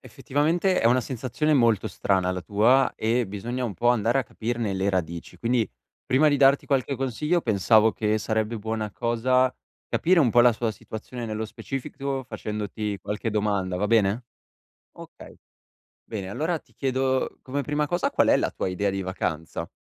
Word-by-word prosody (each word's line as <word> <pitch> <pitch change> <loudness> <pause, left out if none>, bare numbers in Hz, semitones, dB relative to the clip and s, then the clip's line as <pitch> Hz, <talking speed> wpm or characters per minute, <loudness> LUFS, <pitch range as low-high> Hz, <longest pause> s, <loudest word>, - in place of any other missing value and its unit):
effettivamente, 165 +7 0
è - - +3
una 125 +2 +4
sensazione 130 +5 -1
molto 115 -7 +3
strana 95 -2 0
la 90 0 -3
tua 110 +8 +3
e 115 +2 +1
bisogna 120 +6 -4
un 105 - -3
po' 120 - +1
andare 120 +1 +2
a - - -2
capirne 115 -2 -3
le 95 +1 0
radici, 85 -2 -3
quindi 115 +1 0 0.4
prima 140 +4 +4
di 145 - +3
darti 135 0 +5
qualche 135 -1 0
consiglio 150 +7 0
pensavo 110 +1 +4
che 105 0 0
sarebbe 110 0 -1
buona 110 0 -3
cosa 125 +4 +1 0.3
capire 175 +1 +3
un 130 -6 +4
po' 120 - +5
la 120 0 +6
sua 115 0 -2
situazione 115 +3 -7
nello 110 0 -3
specifico, 135 +3 -5
facendoti 105 -2 -4
qualche 105 +2 -3
domanda, 100 -3 0
va 100 +3 0
bene? 110 +1 +2 0.7
Okay, - - -13 0.7
bene, 100 -4 -6
allora, 155 - -1
ti - - -29
chiedo 130 -1 -1
come 140 +2 -3
prima 150 +1 -1
cosa, 175 +3 0
qual - - +2
è - - +6
la - - 0
tua - - -3
idea 100 +2 -1
di 95 0 -3
vacanza? 80 -3 -4
115 Hz, 170 wpm, -25 LUFS, 105-130 Hz, 0.7 s, la